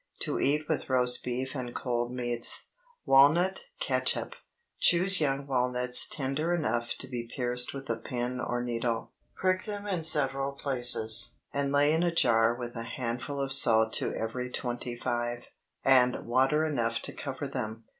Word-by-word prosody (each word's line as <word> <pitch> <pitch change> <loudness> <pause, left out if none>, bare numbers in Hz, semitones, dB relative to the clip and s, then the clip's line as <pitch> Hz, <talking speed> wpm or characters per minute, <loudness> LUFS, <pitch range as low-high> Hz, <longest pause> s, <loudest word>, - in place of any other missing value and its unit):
To - - -1
eat 150 +2 0
with - - -2
roast 125 -1 +3
beef 130 +2 -4
and 125 -3 -6
cold 120 -1 -2
meats. 120 -2 +1 0.4
WALNUT 160 - +4
CATSUP. - - 0 0.5
Choose 185 +1 +4
young 140 -1 0
walnuts 125 -2 +4
tender 150 +5 -2
enough 120 -7 -2
to 135 - -7
be 120 -2 -6
pierced 125 0 -2
with 135 0 -8
a 115 - -2
pin 120 +2 -4
or 120 -1 -2
needle. 115 -1 -3 0.2
Prick 185 0 0
them 205 -1 -6
in 185 -5 -2
several 135 -3 +2
places, 120 -5 +1 0.2
and 140 0 -1
lay 145 +1 +3
in 160 - +1
a 175 - +2
jar 115 -7 +3
with 120 0 -7
a 115 - -4
handful 125 +4 -5
of 135 -1 -1
salt 110 -4 +4
to - - +2
every 125 +3 -4
twenty 120 -1 -4
five, 120 0 -3 0.4
and 125 -2 +3
water 135 +6 +2
enough 115 -7 -1
to - - -5
cover - - -6
them. 110 +1 -5
125 Hz, 160 wpm, -28 LUFS, 120-140 Hz, 0.5 s, WALNUT